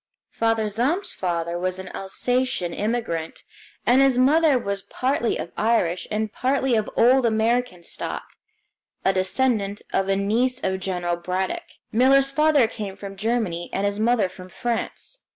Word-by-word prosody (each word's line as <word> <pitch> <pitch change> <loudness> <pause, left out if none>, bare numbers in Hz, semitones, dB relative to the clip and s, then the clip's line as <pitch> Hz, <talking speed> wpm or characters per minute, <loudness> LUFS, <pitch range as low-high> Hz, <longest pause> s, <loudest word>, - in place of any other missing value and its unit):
Father 225 -1 +1
Zahm's 255 - 0
father 170 -1 -2
was 185 +1 -1
an 190 -1 -7
Alsacian 220 -2 -1
immigrant, 210 -7 -3 0.4
and 250 +3 +5
his 270 -2 +4
mother 290 +2 +4
was 200 -4 -2
partly 255 +2 -1
of - - -6
Irish 210 -6 +1
and 215 0 -2
partly 265 0 +1
of 215 -2 +1
old 255 +3 +5
American 225 -3 +1
stock, - - -5 0.8
a 190 - +4
descendant 200 +1 0
of 195 0 +1
a 195 - +3
niece 235 +6 +1
of 190 0 0
General 180 -2 -2
Braddock. 185 +2 -3
Miller's 270 +3 +4
father 300 -3 +4
came 205 -3 -6
from 200 0 -8
Germany, 210 -5 -1
and 195 - -1
his 200 0 -1
mother 225 -2 +3
from 185 0 -12
France. 240 - -4
220 Hz, 150 wpm, -23 LUFS, 190-250 Hz, 0.8 s, and